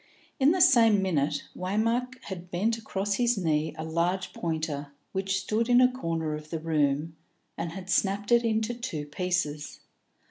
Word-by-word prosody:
In 270 Hz, +1 st, +5 dB
the 365 Hz, +1 st, +1 dB
same 225 Hz, -8 st, +6 dB
minute, 150 Hz, -5 st, 0 dB
Waymark 230 Hz, +7 st, 0 dB
had 180 Hz, -2 st, -7 dB
bent 210 Hz, +7 st, 0 dB
across 200 Hz, -2 st, -2 dB
his 240 Hz, +1 st, +2 dB
knee 155 Hz, -4 st, 0 dB
a 160 Hz, -, -4 dB
large 170 Hz, +4 st, -1 dB
pointer 155 Hz, -4 st, -3 dB, 0.2 s
which 195 Hz, 0 st, -1 dB
stood 220 Hz, +5 st, -1 dB
in 245 Hz, 0 st, +6 dB
a 255 Hz, 0 st, +5 dB
corner 165 Hz, -10 st, -2 dB
of 150 Hz, 0 st, -7 dB
the 165 Hz, -, -2 dB
room, 155 Hz, 0 st, 0 dB, 0.4 s
and 165 Hz, -, -4 dB
had 185 Hz, 0 st, -8 dB
snapped 200 Hz, +2 st, 0 dB
it 235 Hz, 0 st, +5 dB
into 220 Hz, 0 st, 0 dB
two 230 Hz, -12 st, -4 dB
pieces. 150 Hz, -2 st, -2 dB
185 Hz, 165 wpm, -28 LUFS, 160-225 Hz, 0.4 s, same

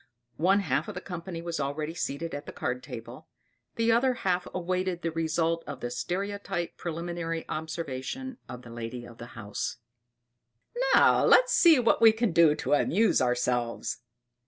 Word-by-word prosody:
One 190 Hz, +5 st, +3 dB
half 200 Hz, -, 0 dB
of 210 Hz, -, -6 dB
the -, -, -3 dB
company 175 Hz, -2 st, -6 dB
was 170 Hz, -1 st, -3 dB
already 150 Hz, +3 st, -2 dB
seated 165 Hz, 0 st, -3 dB
at 145 Hz, +1 st, -6 dB
the -, -, -5 dB
card 125 Hz, +1 st, -3 dB
table, 120 Hz, -5 st, -9 dB, 0.5 s
the 230 Hz, 0 st, +2 dB
other 250 Hz, +2 st, +3 dB
half 180 Hz, -4 st, -1 dB
awaited 185 Hz, 0 st, -2 dB
the 165 Hz, -, -1 dB
result 165 Hz, +1 st, 0 dB
of 145 Hz, -3 st, -6 dB
the 120 Hz, -1 st, -4 dB
stereotype 195 Hz, +1 st, -3 dB
preliminary 170 Hz, -1 st, -4 dB
observation 160 Hz, -, -5 dB
of 125 Hz, 0 st, -8 dB
the 120 Hz, -, -11 dB
lady 120 Hz, +1 st, -6 dB
of 120 Hz, -1 st, -14 dB
the 120 Hz, -, -8 dB
house: 105 Hz, -2 st, -4 dB, 1.2 s
"Now -, -, +5 dB
let -, -, +7 dB
us -, -, -6 dB
see 335 Hz, -4 st, +6 dB
what 235 Hz, -2 st, +2 dB
we 225 Hz, -1 st, +8 dB
can 225 Hz, -2 st, 0 dB
do 165 Hz, -2 st, +5 dB
to 150 Hz, -, -1 dB
amuse 205 Hz, +9 st, +3 dB
ourselves." 125 Hz, -1 st, 0 dB
165 Hz, 165 wpm, -28 LUFS, 140-190 Hz, 1.2 s, we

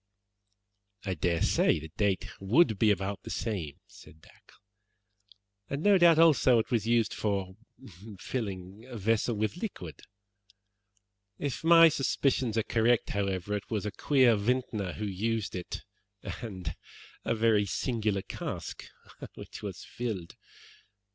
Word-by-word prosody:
"I 95 Hz, -, -1 dB
dare 85 Hz, 0 st, 0 dB
say -, -, +3 dB
the 80 Hz, +1 st, -8 dB
date 100 Hz, -3 st, +1 dB
would 110 Hz, -, +3 dB
be 110 Hz, -, +4 dB
about 100 Hz, -1 st, -1 dB
the -, -, -9 dB
same," 90 Hz, -11 st, -3 dB
said 80 Hz, -, -16 dB
Dacre, -, -, -21 dB, 1.1 s
"and, 140 Hz, +3 st, -3 dB
no 205 Hz, -2 st, +5 dB
doubt, 170 Hz, -2 st, +6 dB
also, 155 Hz, -6 st, +5 dB
it 110 Hz, -1 st, -1 dB
was 115 Hz, -3 st, +1 dB
used 115 Hz, -1 st, +2 dB
for 95 Hz, -3 st, -2 dB, 0.6 s
filling 100 Hz, -3 st, -5 dB
a 125 Hz, -3 st, -7 dB
vessel 115 Hz, +3 st, +1 dB
with 110 Hz, +9 st, -2 dB
liquid. 95 Hz, -, -6 dB, 1.4 s
If 145 Hz, +1 st, -4 dB
my 165 Hz, 0 st, +8 dB
suspicions 135 Hz, -5 st, 0 dB
are 110 Hz, -, +2 dB
correct, 115 Hz, +1 st, +2 dB
however, 100 Hz, 0 st, -1 dB
it 100 Hz, -, -6 dB
was 105 Hz, -3 st, -2 dB
a 105 Hz, -, -2 dB
queer 130 Hz, +1 st, +3 dB
vintner 105 Hz, -3 st, -1 dB
who 105 Hz, -, -4 dB
used 105 Hz, +2 st, -2 dB
it, 90 Hz, -, -6 dB, 0.4 s
and 95 Hz, -7 st, -6 dB, 0.5 s
a -, -, 0 dB
very 110 Hz, -2 st, +3 dB
singular 105 Hz, -2 st, -1 dB
cask -, -, -6 dB, 0.5 s
which -, -, -10 dB
was -, -, -6 dB
filled. 110 Hz, -8 st, -5 dB
110 Hz, 135 wpm, -29 LUFS, 95-120 Hz, 1.4 s, my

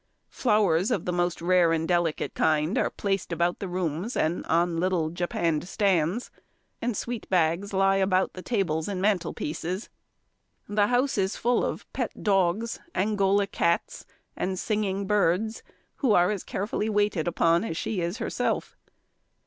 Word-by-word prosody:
Flowers 205 Hz, -6 st, +2 dB
of 215 Hz, -9 st, -1 dB
the 180 Hz, -, -1 dB
most 175 Hz, -1 st, -1 dB
rare 175 Hz, -1 st, +4 dB
and 165 Hz, 0 st, 0 dB
delicate 175 Hz, -3 st, 0 dB
kind 155 Hz, +3 st, +1 dB
are -, -, +1 dB
placed 195 Hz, -3 st, -2 dB
about 170 Hz, +1 st, 0 dB
the 195 Hz, -, -4 dB
rooms 180 Hz, -, -2 dB
and 160 Hz, +3 st, 0 dB
on 170 Hz, 0 st, +2 dB
little 175 Hz, -3 st, 0 dB
japanned 170 Hz, -2 st, -1 dB
stands; 190 Hz, +1 st, +1 dB, 0.5 s
and 230 Hz, -3 st, -1 dB
sweet 240 Hz, -2 st, -5 dB
bags 180 Hz, +2 st, +1 dB
lie 195 Hz, 0 st, +3 dB
about 190 Hz, -1 st, +2 dB
the 185 Hz, -, -8 dB
tables 180 Hz, -8 st, -1 dB
and 200 Hz, -3 st, -3 dB
mantelpieces. 180 Hz, -1 st, -2 dB, 0.8 s
The 205 Hz, 0 st, +2 dB
house 250 Hz, 0 st, +1 dB
is 190 Hz, +1 st, 0 dB
full 240 Hz, +1 st, +1 dB
of -, -, -3 dB
pet -, -, -4 dB
dogs, 200 Hz, +2 st, +1 dB, 0.2 s
Angola 200 Hz, 0 st, +2 dB
cats, 170 Hz, -3 st, -1 dB, 0.3 s
and 185 Hz, 0 st, -2 dB
singing 200 Hz, -1 st, -1 dB
birds, 210 Hz, +2 st, +1 dB, 0.4 s
who 255 Hz, -7 st, +2 dB
are 175 Hz, +1 st, +4 dB
as 205 Hz, -3 st, -3 dB
carefully 210 Hz, +2 st, -2 dB
waited 205 Hz, -6 st, +1 dB
upon 170 Hz, 0 st, +2 dB
as 165 Hz, -8 st, -4 dB
she 195 Hz, -2 st, -2 dB
is 170 Hz, +5 st, -2 dB
herself. -, -, -2 dB
185 Hz, 150 wpm, -26 LUFS, 170-205 Hz, 0.8 s, rare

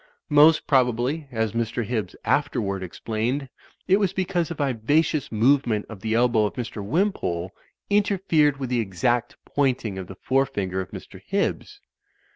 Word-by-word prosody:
Most 150 Hz, +2 st, +6 dB
probably, 130 Hz, +3 st, +1 dB
as 110 Hz, -2 st, -1 dB
Mr. 115 Hz, +1 st, -2 dB
Hibbs 110 Hz, -5 st, -3 dB
afterward 115 Hz, -10 st, 0 dB
explained, 115 Hz, +9 st, -3 dB, 0.4 s
it 190 Hz, +2 st, +4 dB
was 195 Hz, -3 st, +1 dB
because 180 Hz, -3 st, -1 dB
a 170 Hz, -, -4 dB
viva 140 Hz, +2 st, +2 dB
cious 155 Hz, -3 st, -3 dB
movement 115 Hz, -1 st, +2 dB
of 110 Hz, -3 st, -9 dB
the 110 Hz, 0 st, -1 dB
elbow 115 Hz, -3 st, +3 dB
of -, -, -8 dB
Mr. 115 Hz, -4 st, -5 dB
Wimpole 100 Hz, -, -1 dB, 0.4 s
inter 205 Hz, -1 st, +2 dB
fered 150 Hz, -6 st, +2 dB
with 130 Hz, -2 st, -4 dB
the 125 Hz, -, +2 dB
exact 115 Hz, +4 st, -1 dB
pointing 125 Hz, -8 st, -1 dB
of 95 Hz, -, -7 dB
the 95 Hz, -, -9 dB
forefinger 100 Hz, -8 st, 0 dB
of 90 Hz, -, -7 dB
Mr. -, -, -10 dB
Hibbs. -, -, -2 dB
125 Hz, 155 wpm, -24 LUFS, 110-145 Hz, 0.4 s, Most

